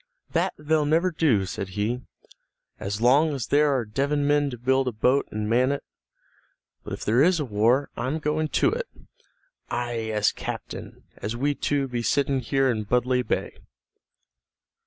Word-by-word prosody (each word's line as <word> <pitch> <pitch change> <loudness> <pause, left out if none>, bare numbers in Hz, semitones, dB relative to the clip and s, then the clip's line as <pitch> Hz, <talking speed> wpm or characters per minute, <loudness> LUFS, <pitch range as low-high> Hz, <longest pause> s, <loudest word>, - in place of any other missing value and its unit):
"That - - 0
they'll 150 0 +1
never 165 +4 +2
do," 140 - +2
said 95 +1 -5
he, 115 +5 -1 0.8
"as 100 +2 -4
long 145 +5 +4
as 125 -5 -3
there 150 +4 +3
are 130 -4 0
Devon 140 +6 0
men 145 0 +2
to 125 - -7
build 130 +2 +1
a - - +1
boat 125 +5 +2
and 105 0 -3
man 125 +4 +3
it. 140 - -3 1.0
But - - -6
if - - -6
there 115 +5 +3
is 175 +2 +4
a 150 - -1
war 120 +5 +2
I'm 135 +5 -2
going 155 0 -1
to - - +2
it, 485 +2 -3 0.8
aye, 120 -2 -2
as 105 -1 +2
certain - - -7
as 110 +2 -4
we 140 +4 0
two 140 -1 -1
be 120 -2 -3
sitting 140 +2 +1
here 135 +2 +1
in 110 -4 -1
Budleigh 125 +3 +2
Bay." - - -3
130 Hz, 170 wpm, -25 LUFS, 115-145 Hz, 1.0 s, long